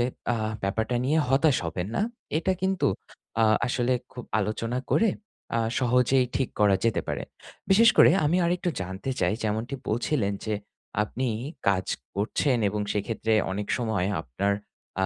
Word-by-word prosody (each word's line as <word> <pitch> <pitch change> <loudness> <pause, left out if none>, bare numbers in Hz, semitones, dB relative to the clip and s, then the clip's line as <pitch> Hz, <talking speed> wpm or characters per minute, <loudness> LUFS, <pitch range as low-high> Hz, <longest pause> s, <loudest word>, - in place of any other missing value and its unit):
তবে - - +3 0.3
আ - - -1 0.3
ব্যাপারটা 110 +5 0
নিয়ে 150 +4 +2
হতাশ 135 +1 +4
হবেন 90 +3 -3
না। - - +2 0.4
এটা 180 +3 +1
কিন্তু 190 -1 +1 0.6
আ - - +6 0.2
আসলে 125 0 +1 0.2
খুব 125 - -8 0.2
আলোচনা 110 +4 -2
করে 225 - +4 0.5
আ - - +2 0.2
সহজেই 125 +1 +3
ঠিক 135 - 0
করা 100 -2 +5
যেতে 115 - +2
পারে। - - -2 0.5
বিশেষ 225 +4 +7
করে - - +8
আমি 165 +5 +3
আরেকটু 175 +1 0
জানতে 95 +7 -5
চাই - - +2
যেমনটি 110 +5 -1
বলছিলেন 115 -2 0
যে, 110 - 0 0.5
আপনি 125 +4 -2 0.4
কাজ 95 -2 +2 0.3
করছেন 120 +6 +1
এবং 105 +1 -2
সেইক্ষেত্রে 110 +2 -1 0.2
অনেক 100 +1 -4
সময় 110 -6 0 0.2
আপনার 90 +10 -1 0.5
আ - - +4
115 Hz, 150 wpm, -26 LUFS, 105-135 Hz, 0.6 s, করে